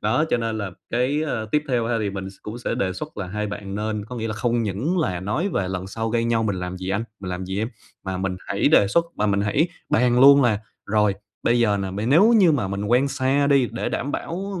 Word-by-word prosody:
đó, 110 +9 +2
cho - - +3
nên 115 -2 -2
là 100 -2 -3 0.2
cái, 130 +6 +1
ờ, 120 -8 -2
tiếp 150 0 +3
theo 120 -3 +1
ha, 120 - 0
thì 105 -2 -1
mình 95 -1 -5
s - - -16
cũng 110 +3 -6
sẽ - - -2
đề 95 -1 -1
xuất 150 +10 -7
là 100 - -4
hai 105 +3 -3
bạn 100 -1 -6
nên 105 0 -2
có 125 +2 -8
nghĩa 115 0 -3
là 105 - -3
không 120 0 0
những 115 - -1
là 90 - -1
nói 130 - -1
về 100 - -1
"Lần 95 0 -4
sau 110 +3 -3
gây 115 0 +1
nhau 115 -1 +1
mình 100 -4 -1
làm 90 0 -4
gì 95 0 -6
anh? 105 +4 -1 0.2
Mình 90 -2 -5
làm 90 +1 -4
gì 95 +1 -3
em?" 110 +2 -1 0.4
mà 95 -1 -3
mình 95 0 -2
hãy - - +2
đề 100 - +5
xuất, 170 +10 +3
mà 105 - +1
mình 100 -1 +1
hãy 135 - +1 0.2
bàn 125 +1 +3
luôn 140 0 +8
là 110 -4 +2 0.3
rồi 105 -1 +2 0.3
bây 120 +1 +3
giờ 105 -3 +3
nè, 95 -1 -3
m 105 +6 -2
nếu 200 +10 +6
như 180 -6 +5
mà 120 -9 0
mình 100 +1 -3
quen 125 +6 +3
xa 135 +1 +1
đi, 140 -4 +3
để 115 - -2
đảm 145 +3 -3
bảo 190 +2 -4
110 Hz, 270 wpm, -23 LUFS, 100-130 Hz, 0.4 s, luôn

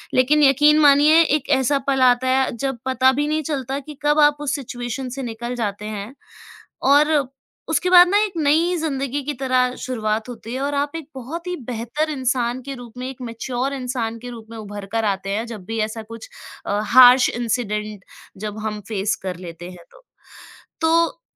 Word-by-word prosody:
लेकिन 295 +4 +4
यकीन 295 +2 +5
मानिए, 295 +2 +6
एक 295 -2 -1
ऐसा 280 +2 +1
पल 270 -1 +1
आता 250 0 +4
है, 265 0 +2
जब 270 +1 -2
पता 260 0 +3
भी 290 +2 -1
नहीं 310 +1 0
चलता 270 -1 -3
कि 290 0 -11
कब 295 +1 +3
आप 295 -1 +5
उस 295 0 -1
सिचुएशन 250 -1 -5
से 270 - -4
निकल 235 +1 -5
जाते 210 -3 -3
हैं। 215 +2 -6 0.8
और 300 +2 +5 0.6
उसके 335 +3 0
बाद 355 -1 +8
ना, 405 - +3
एक 415 - -4
नई 320 +4 +2
ज़िंदगी 280 -3 -2
की 295 - -3
तरह 255 -1 +1
शुरुआत 220 -2 -2
होती 230 -1 -8
है 260 - -3
और 285 0 -1
आप 285 +1 -1
एक 310 -3 -8
बहुत 320 +8 -7
ही 360 - -3
बेहतर 245 +7 -2
इंसान 255 -2 -1
के 275 +1 -6
रूप 245 -2 -11
में, 255 +1 -4
एक 260 -1 -11
मैच्योर 245 +3 -3
इंसान 245 -3 -3
के 245 - -8
रूप 230 -2 -10
में 230 - -9
उभर 205 -1 -8
कर 225 -1 0
आते 195 -1 -2
हैं, 220 +4 -2
जब 220 -5 -9
भी 225 +2 -4
ऐसा 225 0 -7
कुछ 225 +1 -11 0.4
अ, 205 +1 0
हार्श 250 +1 +7
इन्सिडेंट 215 -4 -3 0.3
जब 210 +1 -6
हम 210 -1 -4
फेस 215 0 -1
कर 185 -2 -4
लेते 175 0 -9
हैं। 175 -2 -14 1.0
तो 330 +6 +1
255 Hz, 190 wpm, -21 LUFS, 225-290 Hz, 1.0 s, बाद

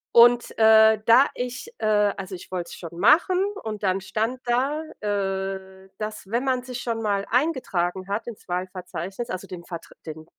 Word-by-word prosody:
und, 240 0 +6
äh, 220 -1 +6
da 235 +4 +7
ich, 255 - -5
äh - - -2 0.3
also, 190 -1 -6
ich 175 - -12
wollte 175 -2 -4
es - - -8
schon 170 -1 -9
machen 335 - +5 0.3
und 215 -2 -5
dann 190 0 +2
stand 225 +6 -2
da, 265 +6 +1 0.2
äh, 195 -2 -3
dass, 215 -1 -5
wenn 240 +3 0
man 255 -2 0
sich 250 -1 -6
schon 230 -2 -2
mal 200 -2 0
eingetragen 195 - 0
hat, 205 +3 -2
ins 235 -5 -10
Wahlverzeichnis, 185 +3 -5
also 185 - -4
den 175 -2 -9
Vertr 170 -2 -8
den 160 -1 -8
210 Hz, 175 wpm, -24 LUFS, 185-240 Hz, 0.3 s, da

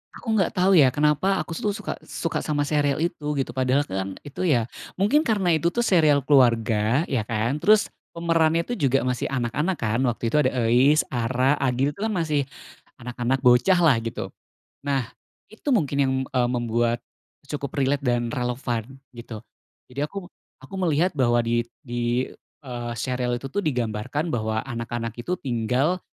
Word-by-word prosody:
Aku - - -12
nggak 190 -5 +2
tahu 185 +1 +3
ya, 140 -6 +6
kenapa 150 +8 +2
aku 165 - -4
tu 205 - -1
suka 210 0 -5
suka 165 - -3
sama 145 -2 -1
serial 145 -1 +1
itu, 155 -3 -2
gitu. 135 - -3
Padahal 130 +2 +1
kan 95 +1 -3 0.2
itu 145 +6 -5
ya 125 -9 +2 0.3
mungkin 285 +11 +3
karena 190 - +2
itu 170 +3 +1
tuh 240 - -3
serial 160 -10 +4
keluarga 120 - +3
ya 120 -6 0
kan, 115 +4 -1
terus 215 0 +5 0.2
pemerannya 165 -1 +1
itu 245 - -2
juga 135 - +1
masih 125 +1 -2
anak-anak 135 +8 -1
kan, 115 +1 0
waktu 120 -2 -1
itu 115 - -1
ada 145 -3 +3 0.2
Euis, 135 +6 +5
Ara, 130 +3 +1
Agil, 135 +2 0
itu - - -18
kan 220 - 0
masih 155 -6 0 0.6
anak-anak 125 +2 -2
bocahlah, 140 +5 +5
gitu. 115 - -4 0.5
Nah, 135 -4 -2 0.4
itu 220 +6 -17
mungkin 145 - 0
yang, 135 -1 +2 0.2
eee, 125 -2 +2
membuat 120 -1 0 0.4
cukup 140 -1 -5
relate 140 0 +1
dan 120 -1 +1
relevan, 125 0 -3 0.2
gitu. 115 -2 -9 0.5
Jadi 140 +4 -2
aku 195 -1 -8 0.3
aku 195 - -9
melihat 175 +1 +2
bahwa 120 -4 +2
di 120 0 0 0.2
di 120 0 -1 0.3
eee, 120 -3 -5
serial 125 +1 -1
itu 135 +2 -7
tuh 205 - -1
digambarkan 125 - -2
bahwa 110 -1 -1
anak-anak 115 -2 -5
itu 180 +9 -2
tinggal 130 +7 0
135 Hz, 165 wpm, -24 LUFS, 120-155 Hz, 0.6 s, ya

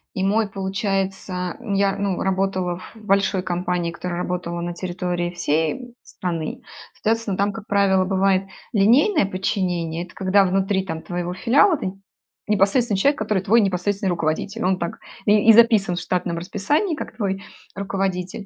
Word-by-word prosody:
и 190 - -1
мой, 210 +2 +2
получается 190 -2 -2
М, 235 -5 -4
я, 195 0 +2
ну, 200 -2 -1
работала 190 -2 0
в 185 - -13
большой 200 -3 +1
компании, 180 -1 -1
которая 175 +1 -5
работала 175 -1 -3
на 175 0 -3
территории 175 -1 -3
всей, 160 -2 0
м, 245 -2 -10
страны. 170 -4 -4 0.3
Соответственно, 225 -3 -1
там, 200 +1 +1
как 225 -2 -9
правило, 195 -2 +3
бывает 195 0 +2 0.3
линейное 240 - +4
подчинение- 180 -4 -2
это 175 - -18
когда 195 +1 +3
внутри, 190 +1 +1
там, 160 -3 -4
твоего 175 0 -3
филиала 285 - +4
ты 185 -7 -4 0.5
непосредственный 210 +2 +2
человек, 285 +7 +3
который 215 -3 0
твой 225 +5 +4
непосредственный 195 0 0
руководитель. 170 +3 -1
Он 185 0 +2
так 170 -1 -4 0.3
и 210 0 +4
и - - +11
записан 220 -5 +5
в 175 - -3
штатном 175 -2 -1
расписании 250 - 0
как - - -7
твой 195 -3 -2 0.3
руководитель. 195 -1 -3
195 Hz, 155 wpm, -22 LUFS, 180-205 Hz, 0.5 s, и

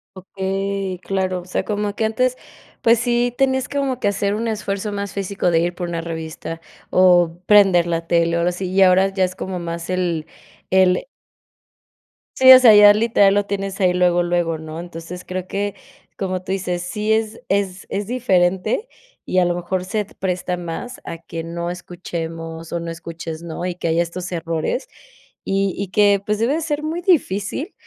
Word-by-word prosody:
Ok, 190 +1 -15 0.7
claro. 185 -2 -1
O - - -15
sea, 185 - -2
como 210 -1 -2
que 220 - 0
antes, 255 +3 0 0.4
pues, 230 +1 +5
sí 240 0 +1
tenías 265 -1 +1
como 275 -3 -1
que - - 0
hacer 200 0 0
un 230 +2 -2
esfuerzo 205 -1 -3
más 200 -2 -4
físico 195 -2 -1
de 165 - +3
ir 175 +1 -1
por 175 -1 -4
una 170 -1 -3
revista, 165 0 -6 0.3
o 175 -2 +4
prender 195 -5 +5
la 165 -1 -2
tele, 170 0 +2
o - - +1
algo 170 +1 +2
así, 180 +2 -4
y 195 +1 +3
ahora 190 +1 +5
ya 195 -1 0
es 185 0 -1
como 185 -1 -4
más 170 0 -5
el 175 -4 -1 0.4
el 185 +1 +3 1.3
Sí, 260 0 +10
o 255 - +10
sea, 235 -4 +8
ya, 205 0 +9
literal, 210 -2 +3
lo 205 0 +1
tienes 195 -1 -3
ahí 180 -1 +4
luego, 175 -1 +3
luego, 175 -2 0
¿no? 160 +1 -7
Entonces, 175 +1 -8
creo 185 0 -5
que, 200 +1 -2 0.5
como 185 -2 -2
tú 190 - -5
dices, 180 -2 -2
sí 210 +4 -2
es 220 0 0
es 195 -1 -1
es 200 +1 -2
diferente, 195 - +1 0.4
y, 185 - +1
a 180 - +3
lo 175 0 0
mejor, 180 +1 -3
se 210 +2 -2
presta 180 -2 -3
más 175 +9 -6
a 165 - -6
que 165 0 -7
no 170 +1 -4
escuchemos 165 -2 -6
o 170 - -1
no 165 0 -5
escuches, 165 -1 -7
¿no? 170 +1 -5
Y 180 - -2
que 170 -1 -4
haya 165 +1 +2
estos 180 +2 -6
errores. 165 - -2 0.6
Y 195 -1 0
y 200 - -3
que, 200 +1 +3
pues, 210 +1 -1
debe 230 +6 +1
de 320 - -1
ser 300 -2 -2
muy 320 +3 -3
difícil, 290 - 0
185 Hz, 190 wpm, -20 LUFS, 175-205 Hz, 1.3 s, Sí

